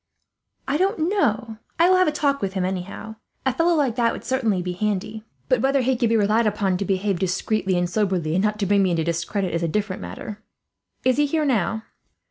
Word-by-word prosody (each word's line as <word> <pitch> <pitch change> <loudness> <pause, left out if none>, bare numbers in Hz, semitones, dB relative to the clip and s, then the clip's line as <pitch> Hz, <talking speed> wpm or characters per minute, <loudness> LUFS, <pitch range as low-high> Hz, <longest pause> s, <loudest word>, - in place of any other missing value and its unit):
"I 275 +2 +1
don't 365 -2 +1
know. 225 - 0 0.2
I 335 - +5
will 370 0 +5
have 370 - +4
a - - +3
talk 285 -2 0
with 195 -1 -2
him, 190 -2 -1
anyhow. 190 +4 -5 0.3
A 265 - +2
fellow 335 +3 +2
like 275 -7 +1
that 235 -1 +3
would - - -7
certainly 230 -7 0
be 180 - -3
handy; 210 +2 -2 0.2
but - - +2
whether 275 0 +2
he 260 +1 +1
could 235 -1 +1
be 230 - +3
relied 215 +2 +3
upon 195 -3 0
to 200 - -2
behave 195 -1 0
discreetly 190 +1 0
and 175 0 +1
soberly, 180 -5 0
and 185 +3 +1
not 210 0 +1
to 205 - -1
bring 200 +1 +3
me 190 - +3
into 165 -2 0
discredit, 170 +3 -2
is 170 - 0
a 170 - 0
different 200 +3 -2
matter. 95 - -7 0.6
Is 255 0 +3
he 295 0 +3
here 310 +1 0
now?" 225 -4 0
210 Hz, 225 wpm, -23 LUFS, 185-260 Hz, 0.6 s, I